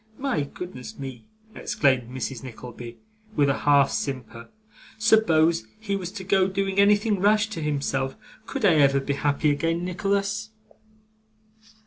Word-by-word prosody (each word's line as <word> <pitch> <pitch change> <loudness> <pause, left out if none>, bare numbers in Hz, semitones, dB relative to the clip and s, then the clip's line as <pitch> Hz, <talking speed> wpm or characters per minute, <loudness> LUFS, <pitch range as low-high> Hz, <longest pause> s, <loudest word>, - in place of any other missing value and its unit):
My 265 - -1
goodness 140 -4 -9
me!' 135 -3 -8 0.3
exclaimed 130 - +1
Mrs. 130 -1 -5
Nickleby, 120 -1 -9 0.4
with 145 -1 +3
a 140 - 0
half 140 -2 +4
simper, 125 -4 -5 0.5
'suppose 170 - +3
he 205 -2 -2
was 185 -2 -4
to 190 - -6
go 190 0 +3
doing 195 0 -1
anything 205 0 +4
rash 210 +2 +3
to 200 -7 -5
himself. 135 -3 -1 0.3
Could 275 -6 -2
I 185 - +6
ever 140 -1 +4
be 140 +1 -2
happy 145 +1 +1
again, 165 +4 -1
Nicholas? 200 +3 -1
160 Hz, 135 wpm, -25 LUFS, 135-200 Hz, 0.5 s, I